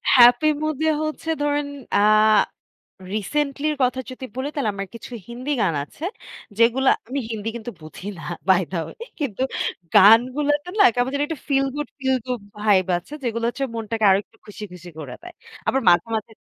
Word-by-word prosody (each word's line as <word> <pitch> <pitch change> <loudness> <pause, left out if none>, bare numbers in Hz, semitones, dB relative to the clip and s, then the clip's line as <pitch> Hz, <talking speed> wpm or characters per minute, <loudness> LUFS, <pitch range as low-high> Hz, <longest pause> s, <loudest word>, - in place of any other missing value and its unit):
Happy 245 +4 +7 0.2
মুডে 310 0 0 0.2
হচ্ছে 310 +1 -4
ধরেন 290 0 0 0.3
আ - - +5 1.2
রিসেন্টলির 295 +7 -1
কথা 255 +1 +1
যদি 255 +1 -8
বলি 265 +2 -2
তাহলে 260 -8 0
আমার 195 0 -4
কিছু 230 +2 -10 0.2
হিন্দি 250 +4 -6
গান 170 -5 +1
আছে। 300 - -11 0.5
যেগুলো 245 +3 +4 0.2
আমি 275 +2 -2
হিন্দি 220 0 -3
কিন্তু 235 +1 -6
বুঝি 155 +5 -10
না - - -9 0.3
বাই 190 0 +5
দা 170 - -1
ওয়ে - - -10 0.3
কিন্তু 255 -3 -2 0.5
গানগুলোতে 255 - +5
না - - +8
কেমন 245 +1 +1
জানি 285 - 0
একটা 320 -4 -5
feel 275 -1 +2
good 295 - -3
feel 265 -1 +1
good 250 -3 -2 0.2
vibe 200 -3 +3
আছে। 175 - -17
যেগুলো 230 -1 -1
হচ্ছে 270 +3 -2
মনটাকে 225 -1 -2
আরো 190 - +5
একটু 225 - -28
খুশি, 210 +1 -10
খুশি 180 0 -11
করে 150 - -7
দেয়। 355 -1 -11 0.3
আবার 270 - +2
মাঝে, 175 +4 +5
মাঝে 220 +1 -5
245 Hz, 175 wpm, -22 LUFS, 210-285 Hz, 1.2 s, না